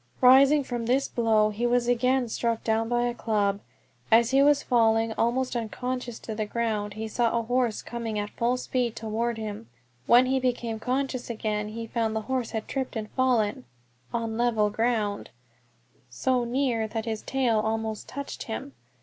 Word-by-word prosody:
Rising 275 +3 +6
from 240 -3 -4
this 265 +3 +2
blow, 220 -2 +2
he 230 +4 -1
was 240 0 +2
again 250 +1 +2
struck 230 0 -1
down 225 0 0
by 240 0 +1
a 240 0 0
club. 205 -4 0 0.5
As 230 +2 +5
he 270 +1 +5
was 285 0 +4
falling 225 -2 +2
almost 250 +3 0
unconscious 245 +1 -3
to 220 - -5
the 215 0 -3
ground 210 -2 -2
he 220 +1 -4
saw 235 +1 +1
a 230 - 0
horse 245 -1 0
coming 230 -2 -4
at 205 0 -3
full 240 +2 0
speed 250 -2 -1
toward 230 +1 -2
him; 210 - -6 0.4
when 245 +2 +7
he 265 +1 +1
became 240 -3 -2
conscious 255 0 -2
again 215 -2 -2
he 230 +2 -6
found 225 -1 -1
the 220 - 0
horse 255 +1 -2
had 220 -2 -4
tripped 265 -2 -3
and 215 -1 -4
fallen 250 -2 +1 0.5
(on 230 -1 -2
level 220 -3 +2
ground) 215 -2 -1 0.8
so 245 - 0
near 240 -3 0
that 220 0 -4
its 220 -2 -3
tail 250 -5 +1
almost 220 0 -2
touched 280 +1 -6
him. 110 +5 -6
230 Hz, 175 wpm, -27 LUFS, 220-250 Hz, 0.8 s, when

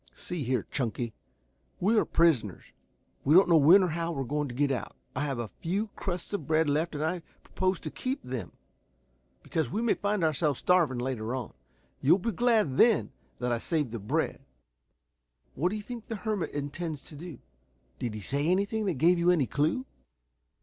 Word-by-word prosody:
"See 175 -3 -4
here, 125 -4 0
Chunky. 120 -3 -2 0.7
We 210 +6 +3
are - - +1
prisoners. 135 - +2 0.6
We 150 +4 +4
don't 190 +1 +7
know 170 -2 +6
when 170 +7 +7
or 180 - +1
how 165 +1 -2
we 140 - -3
are - - -7
going 150 +3 -1
to 120 - -7
get 145 +1 +2
out. 115 -6 -3 0.2
I 130 - -1
have 135 -3 -2
a 115 -3 -4
few 200 +6 -1
crusts 180 -1 -5
of 160 -9 -3
bread 160 0 +3
left 155 +3 0
and 150 +1 -1
I 180 +3 -1 0.2
propose 185 -1 -1
to 155 - -5
keep 260 +2 -3
them, 125 -7 -5 0.9
because 160 -2 -1
we 210 - -2
may 235 -1 +3
find 205 -2 -1
ourselves 150 -3 +1
starving 170 -8 +3
later 120 -1 -2
on. 125 -4 -5 0.5
You'll 160 +7 +5
be 230 +4 -2
glad 215 - +2
then 230 -3 +4 0.3
that 125 0 -2
I 120 - +1
saved 150 -3 -1
the 115 - -4
bread. 105 - -1 1.1
What 170 +7 +1
do 205 - -3
you 210 - -5
think 235 0 -8
the 225 - -3
hermit 205 -5 -2
intends 145 +1 -4
to 150 - -12
do? 165 +1 -8 0.6
Did 115 -3 -3
he 105 - -6
say 140 +9 0
anything 200 +4 +1
that 185 - 0
gave 170 +6 +4
you 170 +1 +3
any 170 -7 +4
clue?" 155 - 0
160 Hz, 195 wpm, -29 LUFS, 135-185 Hz, 1.1 s, don't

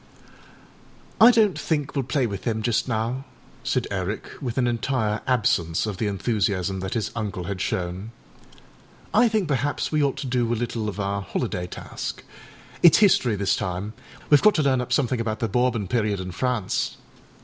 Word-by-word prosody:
â 225 - +9
âI - - +9
donât 210 -5 +3
think 150 -4 -1
weâll 135 -4 -2
play 130 0 +2
with 100 -4 -4
them 110 0 -2
just 120 +2 +1
now,â 120 +3 -1 0.4
said - - 0
Eric, 100 +2 -3
with 125 -3 -4
an 130 - +3
entire 115 -2 0
absence 95 -10 +1
of 105 -3 -4
the 110 - -1
enthusiasm 100 -2 0
that 95 +3 -4
his 110 -2 -1
uncle 105 -5 -3
had 95 0 -4
shown; 90 +4 -2 1.0
âI 240 +2 +5
think 215 -5 0
perhaps 140 0 -1
we 155 -1 +2
ought 140 -1 +1
to 140 - -4
do 125 -2 0
a - - +2
little 115 -2 -2
of 105 - -7
our 100 0 -1
holiday 90 -2 -3
task. - - -6 0.6
Itâs 170 - +9
history 155 - +4
this 100 -1 +1
time; 95 +1 -3 0.4
weâve 145 - +7
got 215 - +5
to 155 - +2
learn 130 -2 +2
up 125 0 -6
something 125 -2 +1
about 110 -1 -2
the 115 - -1
Bourbon 120 -2 +1
period 105 -2 0
in 90 0 -5
France. 120 +1 -1
115 Hz, 180 wpm, -24 LUFS, 100-130 Hz, 1.0 s, â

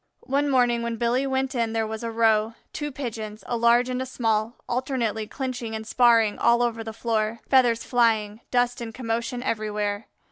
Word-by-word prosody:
One 285 +2 +1
morning 245 -3 +3
when 235 0 -2
Billy 240 +4 +1
went 265 0 -1
in 230 -3 -1
there 225 -1 0
was 220 0 -5
a 230 - -2
row, 225 -1 +2 0.2
two 295 -1 -4
Pigeons, 220 -5 -6
a 240 - -2
large 235 +1 +4
and 255 0 -2
a - - -2
small, 225 -2 0
alternately 240 -4 -1
clinching 250 -4 -4
and 220 0 -5
sparring 230 -2 +4
all 235 +1 +4
over 230 -1 -1
the 225 - -6
floor, 225 0 -1
feathers 245 -4 +4
flying, 220 -3 +1
dust 245 0 +1
and 225 -1 -6
commotion 240 +1 -3
everywhere. 210 -2 -2
235 Hz, 180 wpm, -25 LUFS, 220-250 Hz, 0.2 s, large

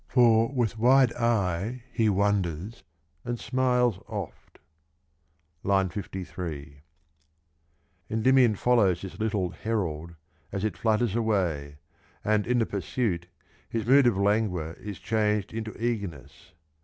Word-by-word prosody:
For 115 -1 +4
with 120 -5 -1
wide 130 +1 +5
eye 115 0 0
he 110 -3 +2
wonders, 100 0 0 0.4
and 120 -1 -3
smiles 125 -4 +1
oft. 100 -6 -7 1.1
(II. 95 -1 +2
53) 85 -7 -6 1.3
Endymion 120 0 +4
follows 100 -6 +2
this 95 - -8
little 105 -5 -1
herald 85 -7 -3 0.4
as 100 0 -3
it 105 -5 -1
flutters 110 +1 +1
away, 90 -11 -1 0.5
and 105 0 +1
in 125 0 +2
the 115 - +2
pursuit 95 -2 -2 0.4
his 115 -2 -2
mood 135 +1 +6
of 115 -5 +2
languor 100 -5 +1
is 105 -3 -7
changed 105 -2 0
into 110 -1 -4
eagerness. 100 - -4
105 Hz, 115 wpm, -27 LUFS, 90-115 Hz, 1.3 s, mood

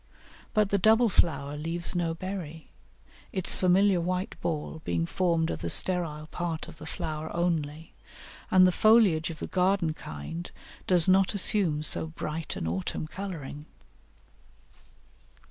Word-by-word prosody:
But 210 -2 +3
the 200 - +1
double 220 +4 +4
flower 145 -6 +1
leaves 165 +3 -3
no 170 -2 -1
berry, 165 -4 -7 0.6
its 185 -2 +1
familiar 185 0 +3
white 180 +2 -2
ball 160 0 -3
being 85 -1 -1
formed 165 - 0
of - - -4
the - - -3
sterile 165 -5 +1
part 165 0 -4
of 170 -1 -12
the 155 - -9
flower 155 -1 -5
only, 160 -3 -2 0.6
and 185 0 +6
the 185 - +4
foliage 200 -6 +4
of 165 - -7
the - - -5
garden 185 -3 +1
kind 155 - -7 0.4
does 175 -3 +5
not 190 +2 +3
assume 185 -6 +2
so 160 - +2
bright 160 0 -5
an - - -4
autumn 90 - -3
colouring. 155 -5 -7
170 Hz, 140 wpm, -28 LUFS, 155-185 Hz, 0.6 s, and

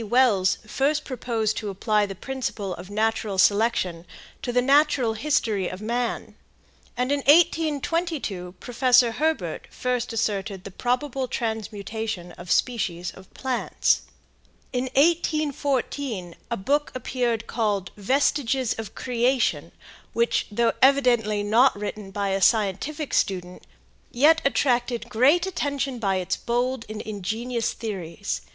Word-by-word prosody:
Wells 215 -5 +3
first 285 +7 0
proposed 230 -4 -2
to 210 - -3
apply 210 +1 +1
the 195 - -7
principle 225 -5 -4
of 180 +2 -9
natural 215 -1 -1
selection 190 -4 +2 0.3
to 245 - -2
the 250 - +3
natural 275 -4 +3
history 220 -6 0
of 185 - -7
man, 235 +3 -2 0.6
and 250 +2 0
in 285 - +2
1822 305 - +1
Professor 250 -1 +3
Herbert 315 +6 -1
first 250 -1 -2
asserted 205 -3 -2
the 195 - -8
probable 255 +4 -1
transmutation 220 -5 -4
of 175 0 -8
species 180 -8 0
of 190 0 -16
plants. 260 -2 +1 0.7
In 250 0 0
1844 285 - 0 0.2
a 235 - -1
book 285 +10 0
appeared 240 -3 -1
called 205 -7 -1
"Vestiges 260 +2 +1
of 225 - -7
Creation," 250 +1 0 0.4
which, 235 0 +1
though 230 +2 +2
evidently 240 -6 +4
not 235 +6 +4
written 210 -1 -5
by 200 0 -2
a 195 0 0
scientific 225 - +1
student, 180 -2 -1 0.4
yet 305 +6 +4
attracted 245 -4 +1
great 280 +10 +4
attention 280 -8 -2
by 195 -4 +1
its 185 0 -1
bold 245 +1 -1
and 215 0 -5
ingenious 220 +4 -3
theories. 200 -4 -4
235 Hz, 120 wpm, -25 LUFS, 205-265 Hz, 0.7 s, evidently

